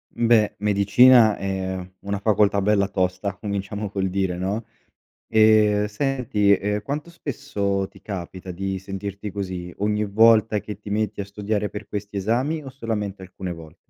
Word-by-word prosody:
M 120 - 0
beh, 115 -2 +4
medicina 105 +3 +5
è 95 -1 -3
una 100 0 -3
facoltà 105 -1 +3
bella 100 0 +2
tosta. 95 +1 -1
Cominciamo 100 0 -4
col 95 -2 -1
dire, 95 -1 -1
no? 100 +5 -2 0.6
Ehm, 110 -1 +4
senti, 110 -3 0
ehm, 105 +1 0
quanto 145 +8 -4
spesso 100 - -2
ti 95 -1 -18
capita 95 -1 -7
di 95 +1 -3
sentirti 100 +1 -6
così? 95 -3 -5
Ogni 105 +1 0
volta 110 +1 +4
che 105 0 -7
ti 105 - -9
metti 105 0 -1
a - - -2
studiare 105 +1 -2
per 105 0 -7
questi 105 0 -6
esami 125 +11 0
o 135 - -7
solamente 105 -6 -4
alcune 95 -1 -6
vol 80 -2 -11
100 Hz, 155 wpm, -23 LUFS, 95-110 Hz, 0.6 s, medicina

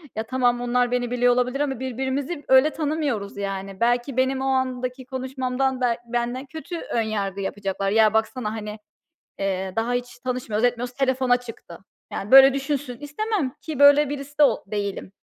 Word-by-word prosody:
Ya, 220 - -2
tamam 245 0 +1
onlar 245 0 +1
beni 245 -1 -1
biliyor 245 0 +3
olabilir 250 +2 0
ama 270 -4 -1
birbirimizi 265 +4 -3
öyle 265 +3 +6
tanımıyoruz, 290 -11 -2
yani. 195 -1 -5
Belki 240 +2 +1
benim 260 +1 +1
o - - -2
andaki 255 0 -2
konuşmamdan 260 0 -2
be 240 -2 +2
benden 240 +2 -2
kötü 320 +4 -7
önyargı 205 - -2
yapacaklar. 195 0 -2
"Ya, 220 0 +4
baksana, 220 0 0
hani, 215 -1 -6 0.6
eee, 190 -1 -2
daha 230 +2 0
hiç 245 0 -4
tanışmıyor, 245 -4 -2
etmiyoruz 245 0 0
telefona 260 -2 +2
çıktı." 230 -8 -11 0.3
Yani, 200 +4 -5
böyle, 270 0 +9
düşünsün 275 -2 -3
istemem, 305 0 -2
ki 310 -4 -6
böyle 285 0 +7
birisi 285 +1 -1
o 255 -5 +3
değilim. 200 -2 -4
250 Hz, 155 wpm, -24 LUFS, 225-270 Hz, 0.6 s, böyle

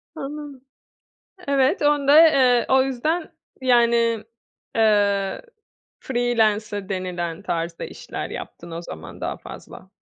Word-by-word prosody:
Anladım. 285 -1 -7 0.9
Evet, 275 -1 +2
onu 290 -1 +2
da, 290 +2 +8
eee, 255 -5 +4
o 265 0 +5
yüzden 305 +6 -2 0.3
yani, 235 -3 +3 0.5
eee, 205 -3 +2 0.6
freelancer 215 -5 0
denilen 180 -3 -3
tarzda 165 -2 -3
işler - - -7
yaptın 170 0 -8
o 165 +1 -5
zaman 80 - -10
daha - - -3
fazla. - - -12
235 Hz, 110 wpm, -22 LUFS, 195-270 Hz, 0.9 s, da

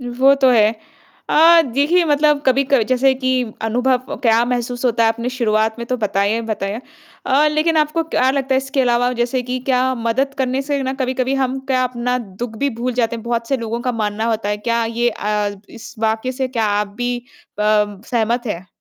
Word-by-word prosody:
वो 255 +3 +3
तो 270 -2 +3
है। 220 -2 +4 0.6
अ, 335 +2 +7
देखिए 305 +7 +3
मतलब 295 -1 +2
कभी 265 +1 +3
क 260 -5 +5
जैसे 260 +1 +3
कि 260 -1 0 0.2
अनुभव 250 +3 0
क्या 230 -1 +4
महसूस 245 0 -3
होता 230 -2 +2
है - - +4
आपने 230 +2 -2
शुरुआत 220 -3 0
में 235 - -5
तो 255 - 0
बताया 205 -2 0
ही 230 - -1
बताया। 210 0 -3 0.5
अ, 285 +3 +3
लेकिन 310 +2 +1
आपको 310 +2 +1
क्या 260 -5 +1
लगता 270 -1 -1
है - - +3
इसके 270 +1 -2
अलावा 245 0 +2
जैसे 245 +1 0
कि 250 +1 -3
क्या 260 0 +2
मदद 250 +4 -1
करने 265 0 0
से 280 0 -2
ना 260 0 -2
कभी-कभी 260 0 -1
हम 265 -1 -1
क्या 255 -1 +1
अपना 250 0 -2
दुःख 220 +1 -7
भी 280 +3 0
भूल 250 +1 -1
जाते 235 -1 0
हैं, 225 - -9
बहुत 235 0 -2
से 270 - +1
लोगों 230 -1 -4
का 250 +1 -2
मानना 215 -1 -2
होता 220 -2 -2
है, 205 - 0
क्या 230 +2 -1
ये 230 +1 0
अ, 210 -1 -2 0.2
इस 230 - -11
वाक्य 220 +3 -1
से 260 0 -2
क्या 230 -4 -1
आप 205 0 0
भी 245 0 -1 0.4
प 210 -2 +1
सहमत 240 +1 0
हैं। 185 -4 -4
245 Hz, 205 wpm, -19 LUFS, 225-265 Hz, 0.6 s, अ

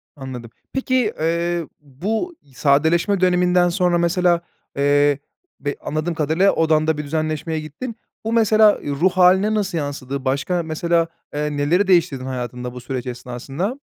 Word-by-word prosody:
Anladım. 125 -4 -8 0.2
Peki, 255 -4 +1
eee, 170 +1 0
bu 205 - -3 0.2
sadeleşme 160 +8 +2
döneminden 180 0 +3
sonra 175 -1 +2
mesela, 170 0 +2 0.4
eee, 145 0 +3 0.4
be 145 0 -3
anladığım 155 +3 -2
kadarıyla, 160 +5 +2
odanda 160 -1 +2
bir 150 - -3
düzenleşmeye 155 +1 -2
gittin. 155 - -7 0.3
Bu 225 - -1
mesela, 215 -2 +5
eee, - - -5
ruh 165 +7 +2
hâline 190 +3 +4
nasıl 195 -4 -1
yansıdı? 140 -2 -4
Başka 140 +7 0
mesela, 165 +1 0 0.3
eee, 150 0 -2
neleri 175 +8 +2
değiştirdin 165 -8 +2
hayatında 125 -1 -5
bu 125 - -8
süreç 125 0 -4
esnasında? 135 - -4
160 Hz, 140 wpm, -21 LUFS, 145-180 Hz, 0.4 s, mesela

